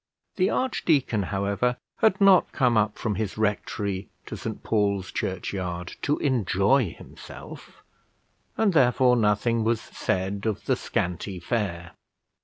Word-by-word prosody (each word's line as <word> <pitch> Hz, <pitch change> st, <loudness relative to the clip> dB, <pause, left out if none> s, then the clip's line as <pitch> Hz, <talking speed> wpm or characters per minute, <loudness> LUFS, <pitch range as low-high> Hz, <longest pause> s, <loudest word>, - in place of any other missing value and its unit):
The 185 Hz, 0 st, +3 dB
archdeacon, 150 Hz, -, +1 dB
however, 100 Hz, +5 st, 0 dB, 0.2 s
had 215 Hz, -3 st, +3 dB
not 195 Hz, -2 st, +5 dB
come 125 Hz, -4 st, +2 dB
up 105 Hz, -1 st, +1 dB
from 110 Hz, -, -1 dB
his 105 Hz, 0 st, -3 dB
rectory 100 Hz, -2 st, -2 dB, 0.2 s
to -, -, -6 dB
St -, -, -6 dB
Paul's 100 Hz, -3 st, 0 dB
Churchyard 90 Hz, -2 st, -4 dB
to 145 Hz, -, +1 dB
enjoy 120 Hz, -, +2 dB
himself, -, -, -12 dB, 0.7 s
and 215 Hz, -4 st, +2 dB
therefore 125 Hz, -3 st, +4 dB
nothing 115 Hz, +1 st, +2 dB
was 115 Hz, 0 st, +1 dB
said 95 Hz, +3 st, -3 dB
of 110 Hz, -, -3 dB
the -, -, +2 dB
scanty 90 Hz, +2 st, -3 dB
fare. 85 Hz, -6 st, -3 dB
105 Hz, 125 wpm, -25 LUFS, 95-125 Hz, 0.7 s, not